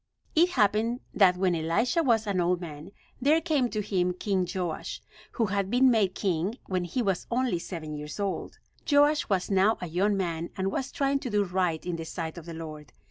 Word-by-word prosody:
It 340 +3 +5
happened 230 - +1
that 185 -3 +5
when 185 -1 +2
Elisha 170 - +1
was 230 -7 +2
an 195 -3 0
old 175 0 +1
man 155 -1 -8 0.3
there 300 +5 +4
can 300 -7 +1
to 215 - -2
him 180 -3 0
King 185 -1 -1
Joash, 175 -4 -3 0.3
who 230 - +1
had 200 -1 -1
been 250 +3 +5
made 200 -5 +2
king 190 +3 -1
when 185 -2 -1
he 240 +8 -1
was 195 -4 -1
only 245 -7 0
seven 165 -3 -6
years 150 +4 -7
old. 200 -1 -3 0.3
Joash 290 +1 +4
was 190 -1 0
now 195 +3 +4
a - - -4
young 190 +5 +1
man 170 -3 -2
and 190 0 0
was 265 +5 -3
trying 275 0 +1
to 255 - -5
do 205 -2 +2
right 180 -3 -1
in 175 -2 -2
the 165 - -5
sight 165 0 -5
of 165 - -14
the 165 - -6
Lord. 155 -2 -8
190 Hz, 205 wpm, -28 LUFS, 175-230 Hz, 0.3 s, It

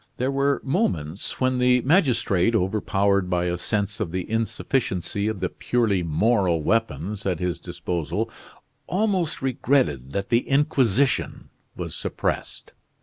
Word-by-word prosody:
There 130 +2 0
were 140 0 +1
moments 100 - -1
when 130 -1 +1
the 125 0 +4
magistrate, 125 - +3
overpowered 100 -1 +1
by 90 -1 +1
a 90 0 0
sense 105 +2 -2
of 100 -7 -2
the 90 0 -3
insufficiency 110 -3 -1
of 110 -4 -3
the 90 - 0
purely 110 -6 0
moral 85 0 +1
weapons 105 -1 -1
at 90 -4 0
his 90 -1 -2
disposal, 85 +3 -3 0.6
almost 185 -5 0
regretted 120 - +1
that 100 +2 -2
the 120 0 +1
Inquisition 135 -3 +1 0.3
was - - -5
suppressed. - - -3
105 Hz, 130 wpm, -24 LUFS, 90-130 Hz, 0.6 s, the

